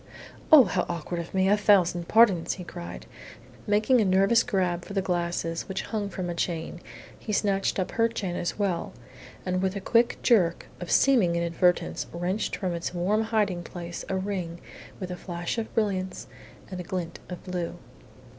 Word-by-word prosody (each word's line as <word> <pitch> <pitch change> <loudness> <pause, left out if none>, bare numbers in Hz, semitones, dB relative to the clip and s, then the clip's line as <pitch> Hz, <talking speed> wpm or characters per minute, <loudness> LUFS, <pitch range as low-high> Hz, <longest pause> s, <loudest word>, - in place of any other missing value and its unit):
"Oh, 305 -4 +10
how - - -1
awkward 170 0 -3
of 170 - -6
me! 190 0 +2
A 205 - +5
thousand 185 -5 +3
pardons!" 210 -7 +4
he 185 - -8
cried. 85 - -8 0.6
Making 215 +4 +3
a - - +2
nervous 195 +5 +4
grab 180 -7 0
for - - -9
the 195 - +1
glasses, 170 -2 -2
which 190 0 -3
hung 210 -3 -3
from 185 -1 -4
a 175 - -2
chain, 170 -1 -3 0.4
he 215 - -5
snatched 200 -1 +1
up 185 - -1
her 230 0 +2
chain 200 -6 -4
as 175 - -3
well, 190 -5 -1 0.5
and 185 0 0
with 190 +1 0
a - - -2
quick 230 +4 +2
jerk 180 -9 +3
of 180 - -6
seeming 230 -11 +4
inadvertence 170 +1 +1
wrenched 180 +5 -2
from 185 -3 -2
its 170 +1 -4
warm 205 +6 +1
hiding 210 -5 0
place 175 0 -7
a 190 - 0
ring 185 -3 -3 0.4
with 185 -2 -5
a - - -3
flash 175 +4 -4
of 220 - -5
brilliants 190 -4 -1 0.5
and 185 - -5
a - - -4
glint 170 -2 -4
of 180 - -7
blue. 180 -2 -4
185 Hz, 180 wpm, -27 LUFS, 175-205 Hz, 0.6 s, Oh